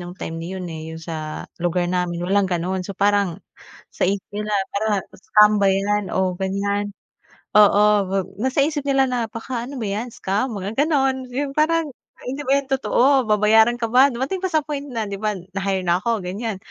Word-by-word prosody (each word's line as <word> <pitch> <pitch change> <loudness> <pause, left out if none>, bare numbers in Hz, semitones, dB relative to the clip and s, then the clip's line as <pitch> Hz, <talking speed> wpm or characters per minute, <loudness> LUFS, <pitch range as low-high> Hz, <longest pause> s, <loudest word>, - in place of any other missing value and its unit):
nung 175 +1 -8
time 165 -1 -5
na 170 - -6
yun, 185 - -5
eh, 160 -1 -7
yung 160 - -8
sa 155 -2 -5 0.2
lugar 175 +1 0
namin 175 -1 -1
walang 195 +1 +2
gano'n. 180 +1 -1
So 190 +1 -7
parang 200 -4 +1 0.5
sa - - -1
isip 195 -1 -1
nila 210 +1 -3 0.2
parang 215 +1 0 0.2
stambay 210 -1 +4
yan 205 0 +1
o 190 -1 +1
ganyan, 200 +1 -1 0.6
oo 210 0 +6 0.6
nasa 260 +4 +1
isip 295 -1 -2
nila 270 -1 +4
na 250 - -1
baka 230 +2 -5
ano 280 - -7
ba 225 - -2
yan, 215 +5 -3
scam? 210 +7 -2
Mga 200 +3 -5
gano'n, 265 -4 0
yung 275 +2 -2
parang, 330 +1 +2 0.3
"Ah, - - -17
hindi 270 +3 -4
ba 275 - +5
yan 275 - -16
totoo 265 0 +3
babayaran 220 +3 +4
ka 230 - 0
ba?" 260 +3 +7
Dumating 265 +10 -3
pa 375 - -1
sa 310 - +4
point 285 -2 -4
na, 230 -4 -3
di 200 - -4
ba, 215 -1 0 0.2
na-hire 190 -1 -1
na 175 +1 +2
ako 230 0 0
ganyan, 200 +3 -3
210 Hz, 195 wpm, -22 LUFS, 190-260 Hz, 0.6 s, ba